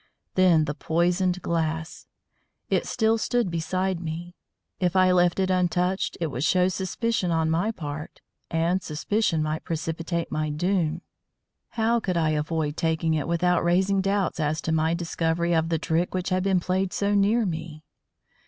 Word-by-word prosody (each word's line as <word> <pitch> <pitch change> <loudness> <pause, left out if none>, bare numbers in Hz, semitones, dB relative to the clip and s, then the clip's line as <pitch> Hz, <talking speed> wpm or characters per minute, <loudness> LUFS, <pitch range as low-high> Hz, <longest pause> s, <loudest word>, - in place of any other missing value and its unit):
Then 175 -4 +4
the 150 - -2
poisoned 175 +3 0
glass! 160 -1 -2 0.6
it - - +1
still 225 0 +1
stood 240 -5 0
beside 185 +2 -1
me; 170 +1 -6 0.5
if 180 -1 0
I 185 -1 +5
left 175 0 +3
it 190 0 +1
untouched 180 +1 0
it 170 - 0
would 130 +1 -3
show 180 +2 +3
suspicion 190 +2 -1
on 160 -1 +1
my 175 +7 +1
part, 150 -7 -6 0.3
and 170 +3 +1
suspicion 165 +1 0
might 155 +1 -2
precipitate 165 +1 -3
my 155 0 -1
doom. 170 +1 0 0.7
How 230 +1 +2
could 185 -5 -2
I 160 -2 +2
avoid 150 0 -1
taking 160 0 0
it 155 -3 -1
without 175 +1 +2
raising 190 +3 +2
doubts 195 -2 0
as 155 0 0
to 160 - -2
my 160 +1 +2
discovery 170 0 -1
of 165 0 +1
the 165 - +1
trick 165 +3 -1
which 185 0 -1
had 185 -1 +1
been 190 -1 +2
played 185 +1 -1
so 205 0 0
near 210 +3 +3
me? 160 -3 -5
170 Hz, 160 wpm, -25 LUFS, 160-185 Hz, 0.7 s, I